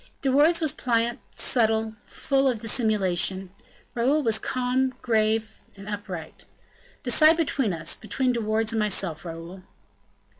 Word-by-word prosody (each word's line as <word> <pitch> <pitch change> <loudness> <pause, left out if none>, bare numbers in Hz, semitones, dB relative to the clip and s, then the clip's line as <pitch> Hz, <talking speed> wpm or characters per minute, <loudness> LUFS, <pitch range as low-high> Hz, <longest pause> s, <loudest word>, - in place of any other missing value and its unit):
De 270 - +2
Wardes 310 +6 +4
was 310 -4 +1
pliant, 235 -1 0
subtle, 220 -2 +1
full 275 -1 +1
of 245 -4 0
dissimulation; 195 -5 0 0.4
Raoul 270 +6 +1
was 220 -2 +1
calm, 255 +1 -1
grave, 220 -1 0 0.2
and 195 0 -11
upright. 195 -6 -7 0.6
"Decide 310 +6 +5
between 275 - 0
us 165 -1 -2
between 250 +4 -1
De 235 - -2
Wardes 220 +1 0
and 225 - 0
myself, 195 -6 -1
Raoul." 170 +2 -8
225 Hz, 135 wpm, -25 LUFS, 205-255 Hz, 0.6 s, Decide